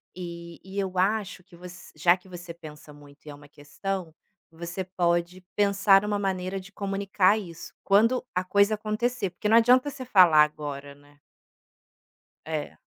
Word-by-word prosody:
E 170 Hz, -1 st, -8 dB
e 195 Hz, +2 st, -6 dB
eu 190 Hz, -1 st, -3 dB
acho 195 Hz, 0 st, -1 dB
que 180 Hz, -1 st, -19 dB
voc 180 Hz, +1 st, -11 dB, 0.3 s
já 175 Hz, 0 st, +4 dB
que 185 Hz, +1 st, -19 dB
você 175 Hz, -1 st, -9 dB
pensa 150 Hz, -2 st, -13 dB
muito 145 Hz, 0 st, -18 dB
e -, -, -10 dB
é 145 Hz, -, -9 dB
uma 145 Hz, 0 st, -16 dB
questão, 160 Hz, +4 st, -6 dB, 0.4 s
você 170 Hz, +3 st, -6 dB
pode 175 Hz, -1 st, -1 dB
pensar 200 Hz, -1 st, +4 dB
uma 205 Hz, -1 st, -1 dB
maneira 190 Hz, -1 st, -2 dB
de 190 Hz, +1 st, -13 dB
comunicar 200 Hz, 0 st, +1 dB
isso 170 Hz, -6 st, -9 dB
quando 225 Hz, +6 st, +3 dB
a 180 Hz, -, +1 dB
coisa 200 Hz, +3 st, +2 dB
acontecer, 215 Hz, -1 st, -2 dB
porque 210 Hz, -, -3 dB
não 225 Hz, -, +6 dB
adianta 250 Hz, +4 st, +4 dB
você 265 Hz, -2 st, -8 dB
falar 180 Hz, -9 st, +6 dB
agora, 145 Hz, -2 st, -5 dB
né. 145 Hz, +1 st, -23 dB, 1.3 s
É. 155 Hz, -1 st, -5 dB
185 Hz, 165 wpm, -26 LUFS, 170-200 Hz, 1.3 s, não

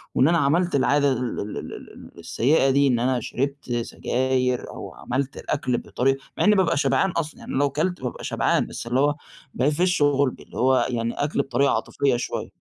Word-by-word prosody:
وإن 135 Hz, -, +5 dB
أنا 170 Hz, 0 st, +3 dB
عملت 165 Hz, +4 st, +2 dB
العادة 140 Hz, +1 st, +3 dB
ال 125 Hz, -1 st, -2 dB
ال 105 Hz, -, -8 dB
الـسيئة 135 Hz, +3 st, +2 dB
دي، 140 Hz, +1 st, +4 dB
إن 120 Hz, -3 st, +2 dB
أنا 125 Hz, +1 st, +1 dB
شربت 140 Hz, +2 st, -4 dB
سجاير 125 Hz, +1 st, -1 dB
أو -, -, -8 dB
عملت 135 Hz, +2 st, -3 dB
الأكل 130 Hz, -4 st, -1 dB
بطريقة 135 Hz, +2 st, 0 dB, 0.2 s
مع -, -, +1 dB
إني 210 Hz, 0 st, +5 dB
بابقى 185 Hz, -6 st, +2 dB
شبعان 190 Hz, +6 st, +2 dB
أصلًا، 160 Hz, -2 st, -4 dB
يعني -, -, -8 dB
لو 140 Hz, +1 st, +2 dB
كلت 170 Hz, +6 st, -2 dB
بابقى 125 Hz, -1 st, -5 dB
شبعان -, -, +1 dB
بس -, -, -7 dB
اللي 125 Hz, +2 st, +1 dB
هو 145 Hz, +1 st, +3 dB, 0.4 s
بافش 175 Hz, +6 st, +1 dB
غُلبي، 140 Hz, -2 st, +2 dB
اللي -, -, -13 dB
هو 130 Hz, +1 st, +3 dB
يعني 115 Hz, -1 st, -2 dB
أكل 145 Hz, -1 st, 0 dB
بطريقة 140 Hz, +1 st, +1 dB
عاطفية 135 Hz, -3 st, 0 dB
شوية. 120 Hz, -, -4 dB
135 Hz, 180 wpm, -24 LUFS, 125-145 Hz, 0.4 s, وإن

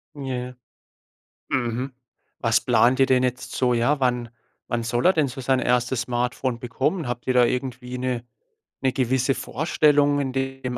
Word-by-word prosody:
Ja. 125 Hz, -3 st, -4 dB, 1.0 s
Mhm. 125 Hz, +1 st, -1 dB, 0.5 s
Was 115 Hz, -1 st, +3 dB
Plant 125 Hz, +2 st, +3 dB
ihr 135 Hz, -, +6 dB
denn 130 Hz, -1 st, +3 dB
jetzt 125 Hz, -1 st, -2 dB
so? 125 Hz, -1 st, +1 dB
Ja, 135 Hz, +5 st, +1 dB
wann 125 Hz, -2 st, 0 dB, 0.4 s
wann 120 Hz, -1 st, -1 dB
soll 120 Hz, +5 st, 0 dB
er 185 Hz, -, +7 dB
denn 150 Hz, -4 st, +2 dB
so 130 Hz, +2 st, -7 dB
sein 130 Hz, 0 st, +1 dB
erstes 125 Hz, 0 st, +1 dB
Smartphone 125 Hz, 0 st, -2 dB
bekommen? 135 Hz, +6 st, -1 dB
Habt 120 Hz, 0 st, -5 dB
ihr 130 Hz, -, +2 dB
da 125 Hz, -1 st, +6 dB
irgendwie 125 Hz, 0 st, -3 dB
'ne 125 Hz, -2 st, -2 dB, 0.6 s
'ne 130 Hz, -1 st, +1 dB
gewisse 130 Hz, +1 st, +1 dB
Vorstellung 145 Hz, -1 st, +2 dB
in 135 Hz, -2 st, -2 dB
dem 135 Hz, -1 st, -3 dB
125 Hz, 160 wpm, -24 LUFS, 125-135 Hz, 1.0 s, er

